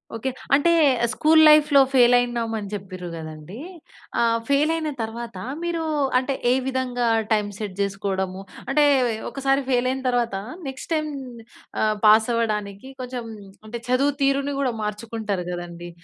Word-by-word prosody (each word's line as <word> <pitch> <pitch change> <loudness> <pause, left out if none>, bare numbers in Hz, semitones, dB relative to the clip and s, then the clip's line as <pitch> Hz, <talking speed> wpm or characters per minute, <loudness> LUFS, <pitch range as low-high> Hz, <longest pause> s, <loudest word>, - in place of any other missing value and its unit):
Okay. 265 +4 -2 0.3
అంటే, 315 +5 +3 0.4
school 315 +1 +4
లైఫ్‌లో 300 -2 +6
fail 245 -1 +6
అయినమని 230 -4 -1
చెప్పిర్రు 185 -3 -6
కదండీ. 155 +6 -9 0.6
ఆహ్, 230 0 +2
ఫెయిల్ 295 +3 +3
అయిన 315 -2 -2
తర్వాత 230 -1 -6 0.3
మీరు 340 -1 -2 0.3
అంటే, 260 +2 0 0.2
ఏ - - +4 0.2
విధంగా 250 -2 -1 0.2
టైమ్ 210 -1 +2
సెట్ 205 -4 -5
జేసుకోవడము, 195 -1 -2 0.3
అంటే 295 +2 +3 0.5
ఒకసారి 275 0 0
ఫెయిల్ 250 -1 +2
అయిన 265 0 -3
తర్వాత 240 -4 0 0.3
నెక్స్ట్ 265 +4 -7
టైమ్ 305 -1 0 0.7
ఆహ్, 215 0 +2
పాస్ 220 +2 +6
అవ్వడానికి 210 0 -2
కొంచెం 250 -1 -5 0.4
అంటే 235 +2 -5
చదువు 270 +3 +2
తీరుని 275 +1 +1
గూడా 260 -3 +1
మార్చుకుంటారు 210 -3 -4
గదండీ. 175 0 -7
235 Hz, 135 wpm, -23 LUFS, 205-270 Hz, 0.7 s, లైఫ్‌లో